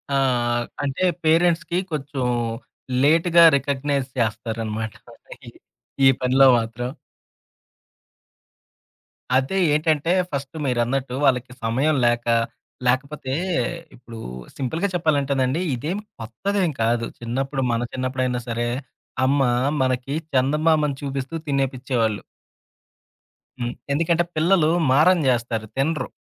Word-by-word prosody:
ఆ! - - +3 0.7
అంటే, 140 +5 -2 0.2
పేరెంట్స్‌కి 165 +1 +2
కొంచెం 140 -3 -3 0.8
లేట్‌గా 165 +3 +5
రికగ్నైజ్ 140 0 -1
చేస్తారనమాట. 110 -1 -2 0.5
ఈ - - -6 0.6
ఈ - - +9
పనిలో 130 +2 +5
మాత్రం. 115 +2 -4 2.5
అదే 130 +8 +1 0.2
ఏంటంటే, 155 +1 +1 0.2
ఫస్ట్ 140 +2 -5
మీరన్నట్టు 125 +1 0
వాళ్ళకి 125 -2 +1
సమయం 135 +7 +1
లేక, 120 0 +1 0.6
లేకపోతే 130 +1 -1 0.6
ఇప్పుడు 115 -2 -11 0.4
సింపుల్‌గా 160 +9 -1
చెప్పాలంటేనండి 140 -3 +1
ఇదేం 155 - -3 0.2
కొత్తదేం 180 - -1
కాదు. 115 0 +1
చిన్నప్పుడు 135 +4 -2
మన 115 0 0
చిన్నప్పుడైనా 130 -1 -1
సరే 120 0 -1 0.6
అమ్మ 140 +2 +2 0.4
మనకి 130 +1 0 0.2
చందమామని 150 +2 +2
చూపిస్తూ 135 +1 -4
తినేపిచ్చేవాళ్ళు. 130 -5 0 1.4
హ్మ్. 120 0 -2 0.2
ఎందుకంటే 165 +3 +2
పిల్లలు 160 0 +3 0.2
మారం 160 +7 +5
జేస్తారు, 115 -3 0
తినరు. 140 0 0
135 Hz, 90 wpm, -22 LUFS, 125-155 Hz, 2.5 s, ఈ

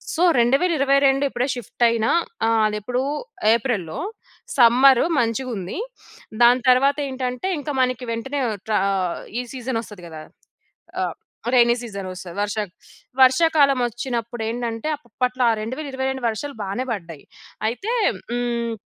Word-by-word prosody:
So 330 - +1 0.2
2022 275 0 +3
ఇప్పుడే 250 0 -1
shift 245 0 -4
అయిన 230 -1 0 0.4
ఆహ్, 225 -1 +3
అదెప్పుడు 230 +5 -2 0.5
ఏప్రిల్‌లో 210 -9 -2 0.6
సమ్మర్ 250 +1 +6 0.2
మంచిగుంది. 230 -5 -2 0.7
దాని 245 +2 +6
తరువాతేంటంటే 265 +2 0
ఇంకా 290 0 -4
మనకి 255 0 -2
వెంటనే 270 +5 -3 0.4
ఆహ్, 190 -3 -1 0.2
ఈ - - 0
సీజన్ 255 -2 -3
ఒస్తది 205 -6 -12
కదా! 160 -1 -9 0.7
ట్రా - - -1
ఆహ్, - - -11 0.4
రేనీ 240 -1 +5
సీజనొస్తది. 190 -5 -7
వర్ష 205 +1 -1 0.7
వర్షాకాలం 275 +1 +5
వచ్చినప్పుడేంటంటే 235 0 -3
అప్పట్లో 250 -1 -2
ఆ - - +4
2022 265 +1 -3
వర్షాలు 275 +5 -4
బానే 200 +6 -3
పడ్డాయి. 170 -8 -7 0.4
అయితే 390 - -3 0.4
హ్మ్. 240 -1 -1
245 Hz, 110 wpm, -22 LUFS, 225-265 Hz, 0.7 s, సమ్మర్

